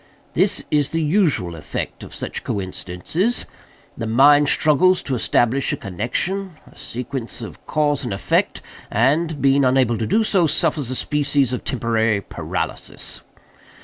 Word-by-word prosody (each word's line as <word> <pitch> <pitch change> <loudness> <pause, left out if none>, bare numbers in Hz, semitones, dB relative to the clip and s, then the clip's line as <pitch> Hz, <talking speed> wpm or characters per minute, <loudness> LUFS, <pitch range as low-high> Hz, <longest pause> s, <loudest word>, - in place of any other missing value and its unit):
This - - +1
is 145 -2 +2
the 165 0 -1
usual 150 - +1
effect 80 - -5
of - - -9
such - - -4
coincidences. 100 - -2 0.5
The 115 - -4
mind 145 +5 +5
struggles 180 +5 +4
to 135 - -3
establish 125 +2 +2
a - - -2
connexion—a 155 - -4
sequence 125 -2 -5
of 110 - -10
cause 145 -2 +1
and 120 - -4
effect—and, 140 - -1
being 140 0 +4
unable 125 -3 +2
to 110 - -1
do 220 - +3
so, 190 -6 +3
suffers 145 -2 +1
a 130 - -3
species 145 -2 0
of 125 - -3
temporary 115 -4 0
paralysis. - - -5
135 Hz, 135 wpm, -21 LUFS, 115-155 Hz, 0.5 s, mind